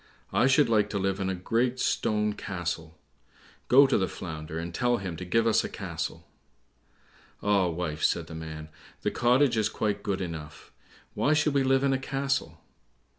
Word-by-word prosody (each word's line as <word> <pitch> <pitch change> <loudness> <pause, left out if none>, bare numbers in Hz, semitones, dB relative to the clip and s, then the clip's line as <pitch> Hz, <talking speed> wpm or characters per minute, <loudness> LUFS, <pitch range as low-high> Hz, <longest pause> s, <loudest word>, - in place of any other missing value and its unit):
I 125 - +4
should 135 +2 +4
like 105 -3 +2
to 100 - -2
live 95 0 -1
in 95 -1 -1
a 95 - -1
great 120 +7 0
stone 105 -3 +1
castle; 85 -5 -5 0.7
go 135 +3 +7
to 135 - +2
the 95 - +1
Flounder, 80 -4 -6
and 85 +1 -5
tell 120 +2 +1
him 95 -5 -5
to 90 - -6
give 115 +6 +2
us 115 - +3
a - - -4
castle." - - -5 1.2
"Ah, 100 -3 +3
wife," 80 -2 -3
said 85 - +1
the 80 - -10
man, 80 -1 -7 0.3
"the - - +1
cottage 125 +1 +3
is 110 -1 +2
quite 105 -2 -2
good 100 -2 -2
enough; 80 -5 -7 0.4
why 145 - +2
should 150 -1 +2
we 140 - +3
live 135 0 +3
in 135 -1 +3
a 130 - 0
castle?" 135 - -2
100 Hz, 180 wpm, -28 LUFS, 85-125 Hz, 1.2 s, go